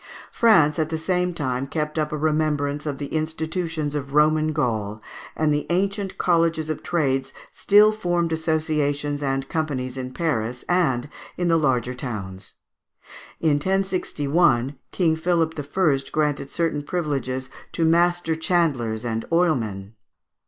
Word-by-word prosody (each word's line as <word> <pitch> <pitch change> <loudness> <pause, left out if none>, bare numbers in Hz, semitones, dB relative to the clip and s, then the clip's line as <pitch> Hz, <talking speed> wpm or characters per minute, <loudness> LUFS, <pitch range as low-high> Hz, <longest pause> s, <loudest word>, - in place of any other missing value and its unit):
France 170 -10 +4
at 155 -1 0
the 160 - -2
same 180 +2 0
time 135 -5 -2
kept 150 +1 -2
up 150 -1 -1
a 150 - -2
remembrance 150 -1 0
of 140 -2 -2
the 140 0 -6
institutions 160 0 -2
of 140 -1 -4
Roman 155 +1 +4
Gaul, 110 -8 -1 0.4
and 155 -1 +2
the 145 - -1
ancient 195 +2 -1
colleges 165 -2 +1
of - - -5
trades 135 -6 0 0.2
still 210 +1 +5
formed 175 -5 -1
associations 150 -3 -1
and 135 -1 -1
companies 135 -5 -3
in 130 -1 -5
Paris 125 -6 -2
and 150 -8 +1 0.3
in 175 -1 0
the 165 - +4
larger 125 -5 +1
towns. 100 -7 -7 0.9
In 155 -3 +3
1061 170 -8 +1 0.2
King 165 -4 +2
Philip 165 0 +1
I. 145 0 +1
granted 150 -3 0
certain 165 -2 -1
privileges 135 -5 -3 0.2
to 165 - +1
Master 170 0 +2
Chandlers 140 -10 0
and 115 -1 -2
Oilmen. 115 - 0
155 Hz, 135 wpm, -23 LUFS, 135-165 Hz, 0.9 s, still